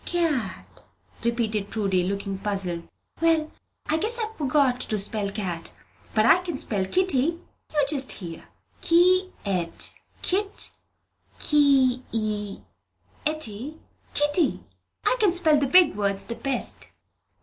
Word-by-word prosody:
Cat?" 310 - -2 0.4
repeated 220 -4 -1
Prudy, 195 -4 0
looking 195 +1 -3
puzzled. 190 -4 -3 0.3
"Well, 325 -2 +2 0.3
I 315 - +1
guess 445 +8 -1
I've 445 -1 -3
forgot 280 -2 +2
how - - -11
to 215 - 0
spell 205 0 +1
cat. 185 -5 -4 0.4
But 215 0 +4
I 340 - +6
can 350 -5 -4
spell 200 -7 0
Kitty. 335 - +1 0.3
You 295 -2 +2
just 275 -3 +3
hear! 170 -4 -8 0.4
Kee 365 +2 +4
et, 180 -4 0 0.3
kit, 395 +2 0 0.7
kee 275 -4 +3
i 210 +5 -4
etty, 295 -1 -3 0.4
kitty! 295 +3 +2 0.4
I - - +3
can 415 -5 +4
spell 325 -4 +3
the 280 - +1
big 360 - +6
words 200 -1 -1
the 235 - -3
best." 275 0 -3
260 Hz, 125 wpm, -25 LUFS, 205-330 Hz, 0.7 s, I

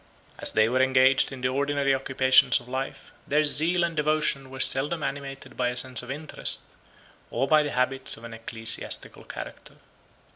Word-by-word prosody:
As - - +1
they 110 0 +4
were 130 +3 +1
engaged 130 0 +3
in 135 -1 -8
the 125 - +1
ordinary 140 +1 0
occupations 130 -1 +3
of - - -15
life, 130 +1 -5 0.2
their 150 +2 +2
zeal 165 +4 +3
and 170 -1 -2
devotion 150 -3 0
were 135 0 -9
seldom 145 +5 +2
animated 135 -1 -6
by 125 - 0
a 125 - -5
sense 125 -2 0
of 125 - -11
interest, 150 +3 -3 0.7
or 135 - -1
by 155 +1 +5
the 150 - -2
habits 130 0 -1
of 115 - -14
an 115 -1 -9
ecclesiastical 115 0 -2
character. - - -9
135 Hz, 175 wpm, -26 LUFS, 130-145 Hz, 0.7 s, by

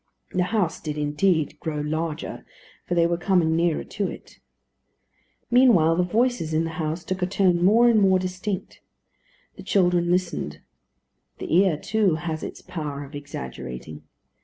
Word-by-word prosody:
The 180 -1 +1
house 195 -4 0
did 150 -1 -4
indeed 150 +1 0
grow 155 -2 -3
larger, 155 +1 -3 0.4
for 175 - -1
they 170 -1 +4
were 170 0 0
coming 175 -4 +2
nearer 170 -1 +1
to 200 -1 -3
it. - - -12 1.1
Meanwhile 225 -11 +5
the 180 - +2
voices 210 -3 0
in 160 - +2
the 165 - -3
house 160 +2 -3
took 185 +2 -4
a 180 - +1
tone 185 -3 +2
more 225 +6 +5
and 225 -3 +4
more 190 -1 +5
distinct. 185 +1 -4 0.8
The - - -9
children 175 -3 +2
listened. 175 - -1 0.8
The - - -2
ear, 185 -4 +4
too, 200 0 +1
has 160 -1 -4
its - - -7
power 145 -4 -5
of 140 +2 -12
exaggerating. 75 - -7
175 Hz, 155 wpm, -24 LUFS, 155-190 Hz, 1.1 s, Meanwhile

